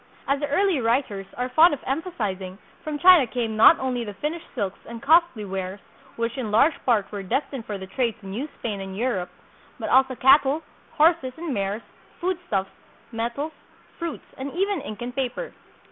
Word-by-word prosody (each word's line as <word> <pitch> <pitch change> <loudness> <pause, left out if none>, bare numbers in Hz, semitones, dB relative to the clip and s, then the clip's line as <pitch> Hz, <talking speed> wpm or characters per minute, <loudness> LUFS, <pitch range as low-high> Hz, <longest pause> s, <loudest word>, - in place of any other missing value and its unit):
As 275 +1 +1
the 290 - -1
early 345 0 +2
writers 225 -5 0
are 250 +1 -2
fond 315 +4 +6
of 270 - -16
emphasizing, 210 - -3 0.3
from 305 -1 -3
China 350 -5 +7
came 230 -2 -2
not 225 +9 +8
only 255 -2 -1
the 205 -3 -7
finished 315 - -4
silks 195 -1 -3
and 235 0 -7
costly 315 -5 +3
wares, 190 0 -4 0.4
which 230 +2 -2
in 230 -4 -3
large 235 +10 +4
part 220 -5 +2
were 205 -2 -4
destined 270 +5 -3
for 205 - -3
the 190 - -7
trade 230 +3 -1
to - - -14
New 225 +11 -4
Spain 205 -4 -4
and 190 0 -7
Europe, 215 -6 -1 0.5
but - - -4
also 260 0 +4
cattle, 275 +4 +5 0.3
horses 315 -4 +3
and 325 -3 -3
mares, 200 +1 -2 0.4
foodstuffs, 345 - -2 0.4
metals, 235 +7 -3 0.5
fruits, 335 -2 -5
and 275 +1 -4
even 390 -1 0
ink 215 0 -7
and 245 0 -6
paper. 270 - -3
250 Hz, 175 wpm, -24 LUFS, 210-300 Hz, 0.5 s, not